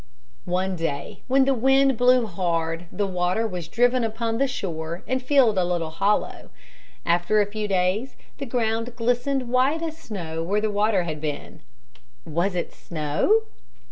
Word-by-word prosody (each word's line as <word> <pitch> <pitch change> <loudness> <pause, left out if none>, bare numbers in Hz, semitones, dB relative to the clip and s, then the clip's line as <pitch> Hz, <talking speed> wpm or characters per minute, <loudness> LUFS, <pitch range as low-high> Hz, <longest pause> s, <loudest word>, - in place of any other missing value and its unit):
One 185 +1 0
day 165 -4 -4
when 265 +1 +4
the 275 - +3
wind 270 +2 +4
blew 250 +1 +4
hard 170 -3 -2
the 205 - -1
water 185 +3 0
was 180 -6 -4
driven 245 +6 +2
upon 225 +1 -2
the 275 - +3
shore 170 -7 -4
and 260 0 0
filled 255 -6 +4
a - - +3
little 175 -2 -1
hollow. 200 +6 0 0.6
After 175 +5 +2
a 205 - +4
few 210 +1 -4
days 195 +6 0 0.2
the 275 - -4
ground 230 0 -1
glistened 245 +2 0
white 260 +6 +2
as 320 -1 -3
snow 170 - -5
where 195 +5 0
the 215 0 0
water 205 -2 +2
had 155 -3 -5
been. 150 -2 -5 0.6
Was 170 +4 -1
it 175 - -3
snow? 160 - +1
210 Hz, 160 wpm, -24 LUFS, 175-245 Hz, 0.6 s, when